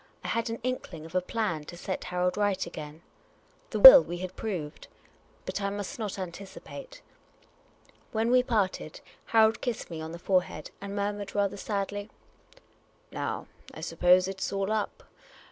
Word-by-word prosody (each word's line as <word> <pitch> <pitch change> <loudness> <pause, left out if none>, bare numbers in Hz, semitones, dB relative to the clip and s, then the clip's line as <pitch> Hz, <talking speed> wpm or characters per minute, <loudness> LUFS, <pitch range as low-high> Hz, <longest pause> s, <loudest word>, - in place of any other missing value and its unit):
I - - -4
had 230 0 -1
an 230 - -3
inkling 190 -11 -4
of 165 - -12
a 185 - +2
plan 180 -6 -2
to 175 - -10
set 185 +2 -4
Harold 180 0 0
right 205 -2 0
again. 155 -1 -9 0.7
The - - -3
will - - +13
we 175 - -5
had 185 +1 -6
proved 170 -9 -5 0.6
but - - -4
I 200 - 0
must 205 +2 -5
not 210 -3 -4
anticipate. 195 - -9 1.1
When 225 +2 0
we 250 0 +6
parted, 205 -10 -2 0.2
Harold 220 -1 +3
kissed 240 -7 -4
me 160 -1 -5
on 160 0 -6
the 170 - -7
forehead, 180 -3 -1
and 200 0 -6
murmured 205 0 -3
rather 200 -1 +1
sadly, 205 0 -3 0.5
" - - -36 0.2
Now, - - -4 0.3
I - - -8
suppose 180 +1 +3
it 190 0 -6
's - - -2
all 195 +1 -1
up. 215 -1 -2
200 Hz, 165 wpm, -28 LUFS, 180-220 Hz, 1.1 s, will